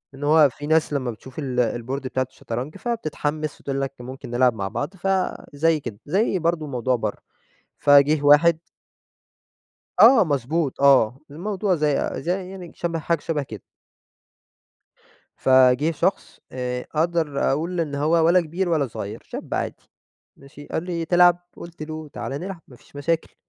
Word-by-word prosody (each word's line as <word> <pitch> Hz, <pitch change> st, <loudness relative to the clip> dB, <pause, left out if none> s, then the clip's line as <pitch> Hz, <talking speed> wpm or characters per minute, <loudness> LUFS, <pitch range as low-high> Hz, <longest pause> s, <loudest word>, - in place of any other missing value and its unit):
إن 140 Hz, -, -9 dB
هو 150 Hz, -1 st, +5 dB
في 145 Hz, +4 st, -8 dB
ناس 160 Hz, -1 st, +2 dB
لما 130 Hz, -4 st, -1 dB
بتشوف 130 Hz, +6 st, -11 dB
ال 130 Hz, -4 st, -2 dB, 0.3 s
الboard 135 Hz, +2 st, -3 dB
بتاعة 130 Hz, -1 st, -2 dB
الشطرنج 125 Hz, +6 st, -6 dB
فبتتحمِّس 155 Hz, -9 st, -3 dB
وتقول 135 Hz, 0 st, -3 dB
لك 135 Hz, 0 st, -3 dB
ممكن 125 Hz, 0 st, -9 dB
نلعب 125 Hz, 0 st, +3 dB
مع 100 Hz, -3 st, -3 dB
بعض، 130 Hz, -, -4 dB
فزي 165 Hz, -4 st, 0 dB
كده، 115 Hz, -6 st, -8 dB
زي 190 Hz, +4 st, +1 dB
برضه 165 Hz, -2 st, -1 dB
موضوع 125 Hz, -1 st, 0 dB
برا 110 Hz, -3 st, -3 dB, 0.6 s
فجيه 145 Hz, +1 st, +5 dB
واحد 155 Hz, +3 st, +6 dB, 1.4 s
آه 245 Hz, -7 st, +8 dB
مضبوط، 145 Hz, 0 st, -1 dB
آه، 135 Hz, -2 st, +4 dB
الموضوع 190 Hz, +4 st, -1 dB
زي 150 Hz, -3 st, 0 dB
زي 180 Hz, +4 st, -3 dB
يعني 185 Hz, -3 st, -9 dB
شَبه 170 Hz, -1 st, -3 dB
حاجة 165 Hz, 0 st, -1 dB
شَبه 150 Hz, -3 st, -2 dB
كده 110 Hz, -7 st, -9 dB, 1.8 s
فجه 130 Hz, +3 st, +5 dB
شخص 190 Hz, +5 st, -2 dB
آآ، 125 Hz, -1 st, -3 dB
أقدر 160 Hz, -3 st, 0 dB
أقول 170 Hz, +4 st, -2 dB
إن 145 Hz, -3 st, -2 dB
هو 150 Hz, +3 st, 0 dB, 0.2 s
ولا 180 Hz, +2 st, +5 dB
كبير 175 Hz, +3 st, -3 dB
ولا 155 Hz, -5 st, +1 dB
صغير 105 Hz, -1 st, -7 dB
شاب -, -, -7 dB
عادي -, -, -4 dB, 0.5 s
ماشي؟ 140 Hz, +1 st, -13 dB
قال 160 Hz, -, -3 dB
لي: 170 Hz, -2 st, -3 dB
"تلعب؟" 175 Hz, 0 st, +5 dB, 0.2 s
قُلت 170 Hz, -2 st, -10 dB
له: 155 Hz, 0 st, -7 dB
"تعالَ 135 Hz, -, -6 dB
نلعب 180 Hz, +4 st, -5 dB
ما 125 Hz, -, -14 dB
فيش 145 Hz, -, -19 dB
مشاكل" 165 Hz, +3 st, -2 dB
150 Hz, 155 wpm, -23 LUFS, 130-170 Hz, 1.8 s, آه